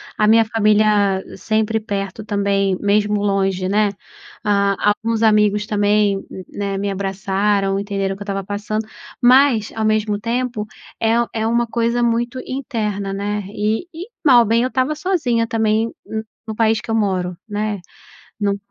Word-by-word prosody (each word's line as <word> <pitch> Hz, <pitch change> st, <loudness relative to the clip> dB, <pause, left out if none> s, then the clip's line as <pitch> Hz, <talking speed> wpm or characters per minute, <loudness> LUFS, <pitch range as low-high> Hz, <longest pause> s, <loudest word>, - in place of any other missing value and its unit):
a 210 Hz, -, +2 dB
minha 225 Hz, +1 st, +5 dB
família 210 Hz, -3 st, +2 dB
sempre 220 Hz, 0 st, 0 dB
perto 200 Hz, -1 st, -4 dB
também, 200 Hz, -2 st, 0 dB
mesmo 205 Hz, 0 st, +1 dB
longe, 195 Hz, -2 st, 0 dB
né, 205 Hz, +2 st, +2 dB, 0.5 s
ah, 200 Hz, -2 st, +2 dB, 0.3 s
alguns 225 Hz, 0 st, 0 dB
amigos 210 Hz, -1 st, +3 dB
também, 205 Hz, -1 st, +1 dB, 0.3 s
né, 200 Hz, -1 st, -3 dB
me 200 Hz, +1 st, -2 dB
abraçaram 195 Hz, 0 st, 0 dB
entenderam 200 Hz, -1 st, -2 dB
o -, -, -9 dB
que -, -, -19 dB
eu -, -, -5 dB
estava 195 Hz, -1 st, -3 dB
passando, 210 Hz, +2 st, -3 dB, 0.3 s
mas 250 Hz, -3 st, +4 dB
ao 220 Hz, -, -2 dB
mesmo 215 Hz, -1 st, +1 dB
tempo 235 Hz, -1 st, -2 dB, 0.3 s
é 225 Hz, +1 st, +2 dB
u 235 Hz, -, +1 dB
é 220 Hz, -1 st, -1 dB
uma 235 Hz, +1 st, +2 dB
coisa 235 Hz, +1 st, 0 dB
muito 235 Hz, +2 st, 0 dB
interna, 215 Hz, -7 st, -3 dB
né, 205 Hz, +1 st, -2 dB
e 215 Hz, -, -1 dB
e 345 Hz, +3 st, -8 dB, 0.2 s
mal 265 Hz, -6 st, +7 dB
ou -, -, +2 dB
bem 230 Hz, +2 st, +2 dB
eu 250 Hz, -, +1 dB
estava 260 Hz, +3 st, 0 dB
sozinha 300 Hz, -9 st, 0 dB
também 220 Hz, 0 st, +1 dB
no 220 Hz, 0 st, -4 dB, 0.2 s
no 220 Hz, -, -4 dB
país 225 Hz, 0 st, +2 dB
que 225 Hz, -, -6 dB
eu -, -, +1 dB
moro, 185 Hz, -5 st, 0 dB
né, 210 Hz, -1 st, -2 dB, 0.6 s
não 200 Hz, -1 st, +1 dB
210 Hz, 165 wpm, -19 LUFS, 200-230 Hz, 0.6 s, mal